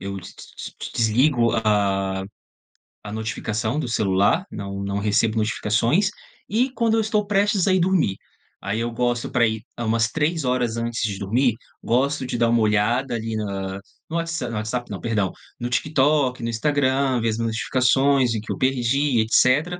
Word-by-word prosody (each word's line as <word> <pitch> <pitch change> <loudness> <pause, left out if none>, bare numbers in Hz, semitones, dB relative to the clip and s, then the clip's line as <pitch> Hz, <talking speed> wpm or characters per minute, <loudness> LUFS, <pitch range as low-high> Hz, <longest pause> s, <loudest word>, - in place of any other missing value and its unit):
eu 100 0 -5
d 95 - -8
d - - -9
d - - -10
d - - -5
desligo 120 +2 +3
a 100 -3 +1 0.8
a 105 - -7
notificação 110 +3 -2
do 125 - -2
celular, 100 - +2
não 100 -1 -5
não 100 0 -2
recebo 110 +2 +1
notificações, 115 - +1 0.4
e 245 +5 +1
quando 230 -3 +1
eu 225 - +3
estou 215 -1 0
prestes 200 -1 +2
a 190 - +4
ir 185 - +3
dormir. 175 - +1 0.4
Aí 100 +3 -3
eu 115 +1 -1
gosto 120 0 -1
para 120 -1 +3
ir 110 -1 -1 0.2
hã, 120 - -3
umas 115 0 +2
3 160 +2 -1
horas 125 -3 0
antes 115 0 -2
de 100 -3 -2
dormir, 115 +5 +1 0.3
gosto 130 +3 +1
de 125 - -4
dar 115 -1 +3
uma 120 - +3
olhada, 110 +5 +1
ali, 115 -1 -3
na 100 -2 -4 0.3
no 165 - -4
whatsa 165 -7 -2
no 115 - -5
WhatsApp 110 +3 -3
não, 100 - -5
perdão. 105 -5 -1 0.3
No 120 +1 -3
TikTok, 135 0 +1
no 115 - -2
Instagram, 130 +1 +1
ver 115 - +1
as 110 - -2
notificações 125 +3 +2
em 110 - -2
que 110 - -7
eu - - -3
perdi, 130 +1 +1
etcétera. 140 +10 +2
120 Hz, 180 wpm, -23 LUFS, 110-140 Hz, 0.8 s, a